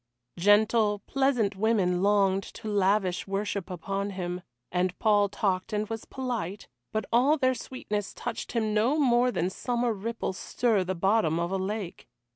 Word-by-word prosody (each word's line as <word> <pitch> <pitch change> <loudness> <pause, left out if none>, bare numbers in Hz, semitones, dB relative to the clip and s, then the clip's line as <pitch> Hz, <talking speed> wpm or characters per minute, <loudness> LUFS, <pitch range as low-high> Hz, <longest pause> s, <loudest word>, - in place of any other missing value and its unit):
Gentle, 205 +1 +3
pleasant 250 -7 +1
women 190 -4 +1
longed 195 -1 +3
to - - -8
lavish 195 -2 +1
worship 200 -1 -2
upon 195 +3 -3
him, 180 -2 -4 0.3
and 180 0 0
Paul 205 -2 +3
talked 190 0 -1
and 210 0 0
was 225 -1 -5
polite, 235 -8 -4 0.2
but 220 0 -1
all 270 +6 +4
their 260 -2 +2
sweetness 210 -5 -4
touched 240 -2 -5
him 220 -3 0
no 230 +8 +2
more 250 -4 +4
than 180 -6 -1
summer 240 +2 -1
ripples 215 -2 -4
stir 225 -6 +1
the 185 +1 -3
bottom 180 -3 +2
of 170 +1 -1
a 195 - 0
lake. 190 -1 -4
205 Hz, 155 wpm, -28 LUFS, 190-230 Hz, 0.3 s, all